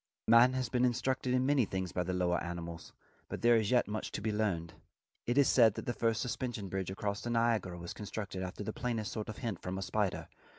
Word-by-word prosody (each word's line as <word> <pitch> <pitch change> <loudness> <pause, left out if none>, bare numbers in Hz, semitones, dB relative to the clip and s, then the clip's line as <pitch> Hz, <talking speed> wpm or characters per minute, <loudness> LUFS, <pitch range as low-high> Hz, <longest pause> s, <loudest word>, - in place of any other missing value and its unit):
Man 115 +3 +7
has 130 -2 -1
been 125 +2 +1
instructed 125 +1 +1
in 125 0 +2
many 140 -2 +4
things 95 -2 -3
by 90 - -1
lower 90 0 0
animals, 85 -1 -6 0.4
but - - -6
there 120 0 +6
is 110 -2 +2
yet 125 -5 +3
much 105 +1 -4
to - - -3
be 110 - 0
learned. 95 -6 -1 0.5
It 120 +3 +1
is 140 - +6
said 115 -5 +5
that - - -5
the 120 - -1
first 115 -2 0
suspension 120 -4 -3
bridge 95 -1 -2
across 100 +1 -3
the 120 - -4
Niagara 115 -6 +1
was 85 0 -6
constructed 100 -2 -5
after 95 +2 -5
the 110 - -4
plainest 115 -5 -2
sort 110 -1 -4
of 110 - -6
hint 110 -7 -4
from 90 +1 -4
a 95 - -3
spider. 105 -1 -1
110 Hz, 225 wpm, -33 LUFS, 95-120 Hz, 0.5 s, Man